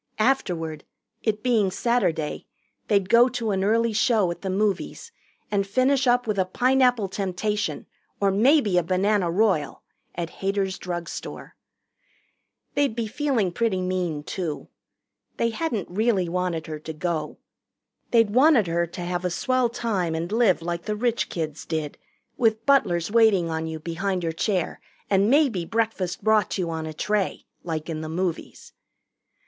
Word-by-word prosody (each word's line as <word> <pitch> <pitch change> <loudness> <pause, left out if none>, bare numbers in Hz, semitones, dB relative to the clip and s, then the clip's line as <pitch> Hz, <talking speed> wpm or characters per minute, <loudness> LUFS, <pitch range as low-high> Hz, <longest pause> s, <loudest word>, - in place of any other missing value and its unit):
Afterward, 175 - 0 0.4
it 210 -2 -1
being 225 -6 +3
Saturday, 185 -8 -1 0.4
they'd 200 -3 +2
go 235 +5 +6
to 235 -4 -2
an 190 -1 0
early 230 +2 +2
show 215 -4 +2
at 170 - -7
the 195 - -3
movies 205 - -1 0.4
and 200 -1 +1
finish 260 +5 +2
up 245 0 +3
with 210 -3 -1
a 185 - +3
Pineapple 250 +1 +2
Temptation 200 +2 -2 0.3
or 200 -1 +3
maybe 215 - +4
a - - -1
Banana 185 +2 +1
Royal 185 -4 +1 0.3
at 170 -1 -4
Hader's 195 -1 -1
drugstore. 175 -1 -6 1.2
They'd 280 -5 +1
be 235 -1 -1
feeling 225 -5 0
pretty 205 0 0
mean, 180 -5 -2
too. 165 -2 -4 0.7
They 230 0 +1
hadn't 225 - -2
really 200 -1 +1
wanted 175 -2 -2
her 155 -1 -6
to 160 +1 -7
go. 160 -2 -3 0.7
They'd 230 -3 +4
wanted 260 -1 +5
her 170 0 0
to 170 - -8
have 175 0 -2
a 180 - 0
swell 255 +7 +1
time 200 -8 -1
and 170 +3 -3
live 215 -7 +3
like 170 0 -3
the 210 - -1
rich 235 +1 0
kids 155 -3 -4
did, 155 -3 -4 0.4
with 225 -2 +1
butlers 190 -11 +2
waiting 210 -7 +4
on 160 0 -2
you 160 0 -5
behind 175 +3 -2
your 165 - 0
chair 185 +1 -1 0.3
and 200 +2 +4
maybe 265 - +3
breakfast 220 -3 -2
brought 220 -1 +2
you 175 -3 -2
on 160 -1 -4
a 155 - -6
tray, 210 +3 -1 0.2
like 160 -2 -4
in 160 -2 -4
the 155 - -5
movies. 175 0 -4
195 Hz, 155 wpm, -24 LUFS, 170-230 Hz, 1.2 s, go